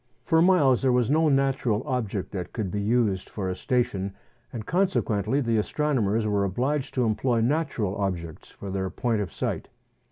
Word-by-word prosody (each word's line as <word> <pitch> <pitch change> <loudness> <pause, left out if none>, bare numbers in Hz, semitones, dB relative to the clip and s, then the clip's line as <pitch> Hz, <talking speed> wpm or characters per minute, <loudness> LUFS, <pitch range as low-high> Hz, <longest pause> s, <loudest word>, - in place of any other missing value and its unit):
For 165 -1 +3
miles 165 -9 +4
there 135 -1 +3
was 125 0 +2
no 160 +1 +4
natural 135 -5 +1
object 110 -6 -2
that 90 -4 -5
could 105 -6 -3
be 105 - -2
used 105 -3 +1
for 100 -3 -4
a - - -3
station, 100 -5 -1 0.4
and 110 -3 -6
consequently 145 - +1
the 115 -3 +1
astronomers 115 -4 0
were 105 -1 +1
obliged 130 +9 -1
to 125 -2 +2
employ 115 +2 +1
natural 120 - 0
objects 90 -5 -4
for 100 - -8
their 95 0 -2
point 115 -1 -1
of 95 - -4
sight. - - -3
115 Hz, 170 wpm, -26 LUFS, 100-135 Hz, 0.4 s, miles